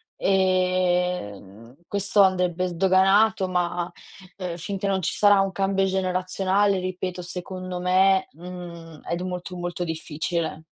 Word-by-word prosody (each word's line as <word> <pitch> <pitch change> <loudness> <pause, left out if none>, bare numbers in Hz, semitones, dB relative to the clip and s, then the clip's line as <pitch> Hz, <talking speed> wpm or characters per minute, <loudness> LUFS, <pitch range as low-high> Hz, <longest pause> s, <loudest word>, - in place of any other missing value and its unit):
e, 185 - +1
mhmm, 105 +5 -15
questo 200 0 +2
andrebbe 185 -1 +2
sdoganato, 190 +3 +3
ma, 175 -1 -1 0.5
ehm, 180 -3 -4
finché 195 +3 -4
non 190 -1 0
ci 170 - -1
sarà 205 -1 +5
un 195 0 0
cambio 195 +1 0
generazionale, 190 +1 +1
ripeto, 185 0 -4
secondo 180 +1 -6
me, 190 +1 +3
mhmm, 170 -1 -10
è 170 - -3
d 175 - -5
molto, 180 -1 -5
molto 175 0 -3
difficile. 160 0 -3
185 Hz, 130 wpm, -24 LUFS, 175-190 Hz, 0.5 s, sarà